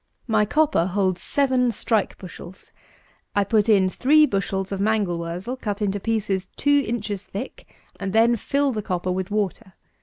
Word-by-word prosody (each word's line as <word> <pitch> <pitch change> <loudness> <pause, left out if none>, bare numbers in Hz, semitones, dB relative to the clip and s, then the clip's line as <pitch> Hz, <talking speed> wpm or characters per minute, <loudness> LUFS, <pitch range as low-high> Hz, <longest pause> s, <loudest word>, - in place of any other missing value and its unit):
My 215 -3 +2
copper 290 - +2
holds 185 -1 0
seven 260 -3 +2
strike 220 -1 0
bushels; 185 0 -11 0.6
I 205 - +3
put 215 +2 +1
in 195 -3 +5
three 300 +10 +4
bushels 195 -4 -2
of 195 -1 -2
mangel 205 -5 +1
wurzel 175 +9 -4
cut 205 -5 -4
into 205 -1 -1
pieces 200 -3 -1
two 285 0 +3
inches 210 -4 -3
thick, 210 +8 -8 0.3
and 195 -1 -3
then 230 +3 +4
fill 280 +5 0
the 215 -3 -3
copper 185 -3 -2
with 185 0 -2
water. 205 -1 -2
205 Hz, 160 wpm, -23 LUFS, 190-235 Hz, 0.6 s, in